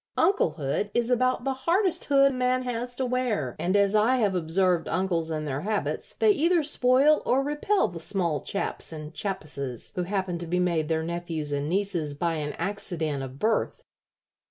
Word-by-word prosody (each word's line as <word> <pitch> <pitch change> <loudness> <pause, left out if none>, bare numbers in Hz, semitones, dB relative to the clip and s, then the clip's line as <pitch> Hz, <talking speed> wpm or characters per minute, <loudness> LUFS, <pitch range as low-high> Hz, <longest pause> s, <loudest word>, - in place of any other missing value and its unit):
Unclehood 160 - +1
is 240 +1 +1
about 255 0 +1
the 270 0 0
hardest 345 +6 +1
hood 275 -1 +4
man 255 0 +1
has 245 0 -3
to 260 - -1
wear, 245 - -1
and 185 +3 0
as 200 0 +3
I 215 +4 +4
have 210 -5 +1
observed 175 0 +2
uncles 170 -2 0
and 155 -1 -3
their 135 0 -3
habits, 210 +3 -2
they 435 - +4
either 340 -2 +2
spoil 280 +1 +3
or 265 +2 +2
repel 295 +8 +1
the 175 -1 -8
small 170 -4 -1
chaps 200 - -2
and 155 0 -8
chappesses 145 - -3
who 180 - -1
happen 185 -2 -2
to 170 - -6
be 180 +2 0
made 170 -4 +1
their 160 0 0
nephews 165 -3 -4
and 145 +1 -2
nieces 175 -6 -1
by 170 +3 -1
an 150 -1 -3
accident 165 -8 -3
of 135 0 -7
birth. 220 +8 0
190 Hz, 180 wpm, -26 LUFS, 160-255 Hz, -, hood